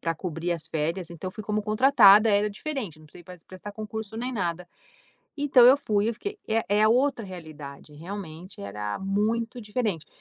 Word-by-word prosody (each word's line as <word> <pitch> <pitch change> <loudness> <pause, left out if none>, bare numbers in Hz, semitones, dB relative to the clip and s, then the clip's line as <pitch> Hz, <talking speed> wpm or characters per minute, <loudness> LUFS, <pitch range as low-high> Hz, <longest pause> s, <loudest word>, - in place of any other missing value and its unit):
para 165 -1 -2
cobrir 170 0 -4
as 170 -3 -2
férias, 165 +3 -3
então 170 +2 -6
fui 215 +2 -8
como 210 0 -1
contratada. 215 -2 +6
Era 205 0 +2
diferente, 210 - -5
não 155 - -16
precisei 175 - -14
pas 180 -1 -13
prestar 185 +2 -9
concurso, 215 +1 -6
nem 250 +3 -3
nada. 175 -5 -3 0.7
Então 280 -3 +5
eu 270 +3 +7
fui, 215 -5 0
eu - - -2
fiquei 405 - -6
é 225 0 +1
é 210 +2 +4
outra 255 +1 +2
realidade, 155 -6 -10
realmente 175 +1 -8
era 105 +1 -4
muito 225 +5 -1
diferente. 210 -7 -2
205 Hz, 175 wpm, -26 LUFS, 170-225 Hz, 0.7 s, eu